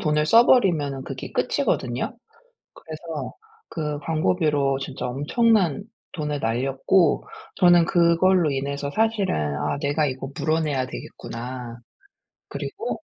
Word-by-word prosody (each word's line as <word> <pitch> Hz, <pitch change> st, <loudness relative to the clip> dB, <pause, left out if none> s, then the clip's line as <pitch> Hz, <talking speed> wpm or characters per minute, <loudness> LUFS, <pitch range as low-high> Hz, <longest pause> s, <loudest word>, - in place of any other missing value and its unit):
돈을 150 Hz, -1 st, +1 dB
써 230 Hz, +8 st, +7 dB
버리면은 155 Hz, -, +3 dB
그게 -, -, -7 dB
끝이거든요. 125 Hz, -, -1 dB, 0.6 s
그래서 160 Hz, -1 st, -7 dB, 0.4 s
그 150 Hz, -2 st, -3 dB
광고비로 150 Hz, -3 st, +1 dB
진짜 135 Hz, -2 st, -5 dB
엄청난 170 Hz, -, +1 dB, 0.3 s
돈을 150 Hz, -3 st, -3 dB
날렸고 135 Hz, +9 st, +1 dB, 0.3 s
저는 175 Hz, -2 st, +6 dB
그걸로 170 Hz, 0 st, +3 dB
인해서 140 Hz, +1 st, -3 dB
사실은 220 Hz, -3 st, +1 dB, 0.2 s
'아 -, -, -1 dB
내가 145 Hz, +1 st, +1 dB
이거 130 Hz, 0 st, -4 dB
물어내야 155 Hz, -5 st, 0 dB
되겠구나.' 120 Hz, -1 st, -7 dB, 0.7 s
그리고 440 Hz, +4 st, -5 dB
150 Hz, 270 characters per minute, -23 LUFS, 135-175 Hz, 0.7 s, 써